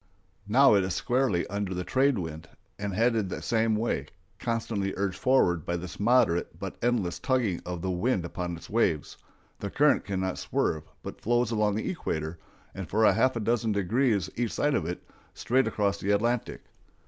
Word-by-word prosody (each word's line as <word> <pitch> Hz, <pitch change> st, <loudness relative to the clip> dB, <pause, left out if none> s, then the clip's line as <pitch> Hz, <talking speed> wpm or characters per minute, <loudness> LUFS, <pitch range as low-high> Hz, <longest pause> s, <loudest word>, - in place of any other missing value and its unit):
Now 130 Hz, +4 st, +6 dB
it 100 Hz, -2 st, +4 dB
is 95 Hz, -1 st, -2 dB
squarely 125 Hz, -8 st, +1 dB
under 100 Hz, -2 st, -3 dB
the 90 Hz, -, -2 dB
trade 135 Hz, +4 st, +2 dB
wind 80 Hz, -3 st, -6 dB, 0.3 s
and 100 Hz, 0 st, -2 dB
headed 115 Hz, -3 st, +2 dB
the -, -, -4 dB
same 115 Hz, -1 st, +1 dB
way; 115 Hz, +2 st, -1 dB, 0.3 s
constantly 115 Hz, -4 st, -2 dB
urged 95 Hz, -1 st, -2 dB
forward 90 Hz, -, +3 dB
by 85 Hz, -, -2 dB
this 85 Hz, +1 st, -8 dB
moderate 115 Hz, -6 st, +2 dB
but -, -, -6 dB
endless 115 Hz, -7 st, 0 dB
tugging 125 Hz, -9 st, 0 dB
of 90 Hz, -2 st, -4 dB
the 95 Hz, -, 0 dB
wind 90 Hz, 0 st, 0 dB
upon 85 Hz, 0 st, -4 dB
its -, -, -12 dB
waves, 95 Hz, -9 st, 0 dB, 0.4 s
the -, -, -4 dB
current -, -, +3 dB
can 95 Hz, -1 st, -3 dB
never 95 Hz, -1 st, -2 dB
swerve, 80 Hz, -1 st, -1 dB, 0.2 s
but -, -, -8 dB
flows 120 Hz, 0 st, +1 dB
along 105 Hz, -2 st, +1 dB
the 110 Hz, -, -2 dB
equator, 80 Hz, -, -3 dB, 0.3 s
and 95 Hz, -5 st, -7 dB
for 110 Hz, +4 st, +3 dB
half 130 Hz, +3 st, +2 dB
a -, -, -1 dB
dozen 115 Hz, 0 st, +1 dB
degrees 100 Hz, 0 st, +1 dB
each 120 Hz, -2 st, -1 dB
side 145 Hz, 0 st, +1 dB
of 80 Hz, -, 0 dB
it, 90 Hz, -, -6 dB, 0.3 s
straight 130 Hz, 0 st, +1 dB
across 100 Hz, -2 st, 0 dB
the 100 Hz, -, -3 dB
Atlantic. 115 Hz, +4 st, 0 dB
105 Hz, 185 wpm, -28 LUFS, 90-120 Hz, 0.4 s, Now